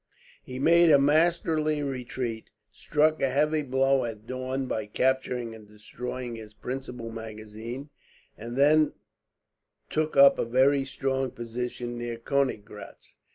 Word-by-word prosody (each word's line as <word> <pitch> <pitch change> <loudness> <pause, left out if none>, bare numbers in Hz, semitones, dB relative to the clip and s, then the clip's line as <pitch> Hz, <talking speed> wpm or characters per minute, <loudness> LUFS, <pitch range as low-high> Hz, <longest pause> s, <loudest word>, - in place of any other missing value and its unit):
He 130 - -8
made 170 +4 +5
a 145 - +8
masterly 155 0 +2
retreat, 125 -4 -4 0.2
struck 155 +7 +1
a 135 - +2
heavy 150 +3 +1
blow 135 -1 +2
at 110 -2 -6
Daun 130 +2 -3
by 110 -4 -3
capturing 125 0 0
and 110 -2 -13
destroying 120 +3 -7
his 110 -1 -11
principal 125 -2 -6
magazine, 110 +4 -8 0.4
and 120 +3 -7
then 150 +2 +4 1.0
took 155 -1 -1
up 140 0 +7
a - - +1
very 135 +3 +3
strong 135 0 -1
position 120 +1 -5
near 120 -1 -4
Koeniggraetz. 115 -6 -3
130 Hz, 125 wpm, -27 LUFS, 115-140 Hz, 1.0 s, a